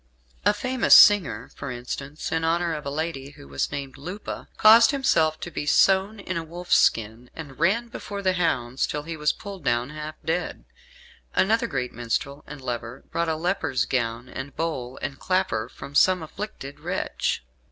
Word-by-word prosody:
A - - +6
famous 255 +4 +4
singer, 205 -4 +6
for 140 - -7
instance, 135 +4 -5
in 160 0 0
honour 170 +1 +1
of 150 -2 -5
a - - 0
lady 145 -2 -4
who 70 - -14
was 70 0 -2
named 135 -1 -6
Lupa, 180 +8 -7
caused 225 +2 +8
himself 160 - +2
to 175 - -5
be 145 - -4
sewn 195 +6 +3
in 185 -2 -4
a 165 - -2
wolf's 175 +2 -1
skin, 115 +2 +1
and 140 -5 -9
ran 205 +8 +2
before 200 -3 -7
the 185 -1 +3
hounds 135 -8 0
till 150 0 -3
he 165 +1 -5
was 150 -1 +2
pulled 195 -4 -9
down, 120 +1 0
half 155 0 -6
dead. 175 +2 -2 0.7
Another 220 +4 +3
great 125 -6 -3
minstrel 135 +4 -3
and 150 -1 -9
lover 120 0 -5
bought 170 -1 0
a 160 - +1
leper's 160 -6 0
gown 115 -1 -2
and 135 +2 -7
bowl 130 -6 -3
and 135 - -4
clapper 185 - 0
from 140 - -10
some 185 +3 +4
afflicted 155 -5 -7
wretch. - - -2
155 Hz, 175 wpm, -25 LUFS, 135-185 Hz, 0.7 s, caused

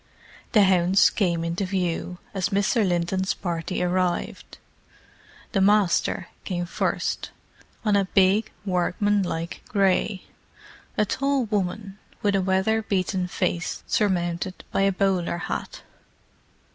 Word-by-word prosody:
The 210 -3 +7
hounds 185 0 +4
came 170 -5 0
into 170 +3 -2
view 180 -2 -2 0.2
as 190 -2 -1
Mr. 200 +4 +2
Linton's 185 +1 0
party 175 0 -3
arrived. 180 0 -1 0.9
The 195 - +1
"Master" 195 -3 +2
came 175 -2 -2
first, 170 - -2 0.6
on 210 -1 +3
a 200 -1 +3
big, 200 +3 +4
workmanlike 180 -2 0
grey; 195 -1 +1 0.7
a 210 - +3
tall 275 +3 0
woman, 200 -1 -3 0.2
with 205 -1 +2
a 195 - +2
weatherbeaten 190 -1 0
face 175 -2 -2
surmounted 185 -2 -1
by - - +1
a 195 0 +4
bowler 185 -3 0
hat. - - -5
190 Hz, 110 wpm, -25 LUFS, 180-200 Hz, 0.9 s, The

